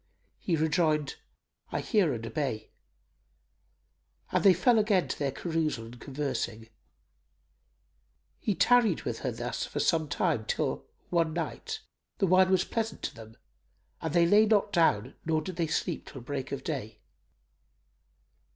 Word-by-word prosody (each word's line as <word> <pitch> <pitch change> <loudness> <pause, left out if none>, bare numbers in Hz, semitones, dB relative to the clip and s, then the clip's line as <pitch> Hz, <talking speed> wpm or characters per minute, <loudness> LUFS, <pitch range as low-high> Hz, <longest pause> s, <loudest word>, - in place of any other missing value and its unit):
He 175 - 0
rejoined, 155 -2 +1 0.5
"I - - -1
hear 205 - +2
and 115 -2 -4
obey;" 135 -4 -3 1.6
and - - +1
they 195 - +8
fell 230 +6 +4
again 205 -4 +2
to - - -4
their 140 -2 0
carousal 155 -5 -2
and 120 +2 -12
conversing. 130 -5 -3 1.7
He 205 - -1
tarried 245 +4 +4
with - - -3
her - - -2
thus - - -4
for - - -4
some 160 -3 +2
time 150 - 0
till, - - -2 0.2
one 165 -2 +2
night, 440 - -4 0.4
the 200 - +2
wine 185 +1 +5
was 190 -1 +3
pleasant 225 -1 -3
to - - -3
them 110 -2 -13 0.6
and 160 - -2
they 170 +1 +4
lay 210 +5 +5
not 210 -2 +2
down 160 - +2
nor 160 -1 +1
did 175 +3 -6
they 165 -2 +1
sleep 160 +1 -2
till 135 - -9
break 135 +1 -5
of 140 - -4
day. 135 - -4
160 Hz, 145 wpm, -29 LUFS, 140-185 Hz, 1.7 s, they